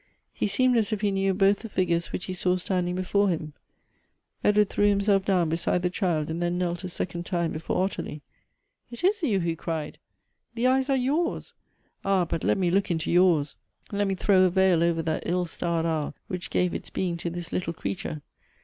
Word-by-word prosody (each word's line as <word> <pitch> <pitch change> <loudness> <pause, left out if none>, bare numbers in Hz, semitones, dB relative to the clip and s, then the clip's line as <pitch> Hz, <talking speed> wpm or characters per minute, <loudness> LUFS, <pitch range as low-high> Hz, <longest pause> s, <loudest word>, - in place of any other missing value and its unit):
He - - -1
seemed 250 +4 +3
as 225 0 +1
if 210 -2 -1
he 205 -2 +2
knew 195 0 +1
both 195 +1 +3
the 225 - -8
figures 170 -3 0
which 180 - -4
he 185 - -4
saw 180 0 +1
standing 180 -1 -1
before 200 +2 +1
him. 155 -3 -3 0.9
Edward 210 0 +4
threw 205 - +3
himself 200 -1 +3
down 185 -4 +2
beside 165 +2 0
the 180 - +1
child, 175 -6 0
and 165 +2 -3
then 175 0 0
knelt 175 0 -2
a 185 - -4
sec 180 0 -4
ond 170 - -3
time 170 -3 0
before 160 +3 -1
Ottilie. 155 -6 -4 0.3
" - - -50
It 235 +5 -8
is 395 +2 +2
you," 225 - +1
he 170 -1 -1
cried: 160 -2 -4 0.6
"the 235 +1 -1
eyes 265 +1 +3
are 270 - +3
yours! 295 +7 -1 0.5
ah, 195 -2 +2
but 165 -1 -3
let - - +2
me 180 -3 +1
look 195 +2 +1
into 160 -3 -1
yours; 170 -5 +3 0.4
let 205 0 0
me 195 - 0
throw 190 0 +3
a 185 - +5
veil 185 -2 +3
over 170 -1 +1
that 160 -1 -1
ill 180 +1 +1
starred 165 -1 -2
hour 160 -3 -1
which 180 -1 -5
gave 180 -1 +1
its - - -5
being 180 -2 -2
to 170 - -3
this 175 0 -6
little 175 -2 -1
creature. 80 - -5
180 Hz, 215 wpm, -26 LUFS, 170-200 Hz, 0.9 s, a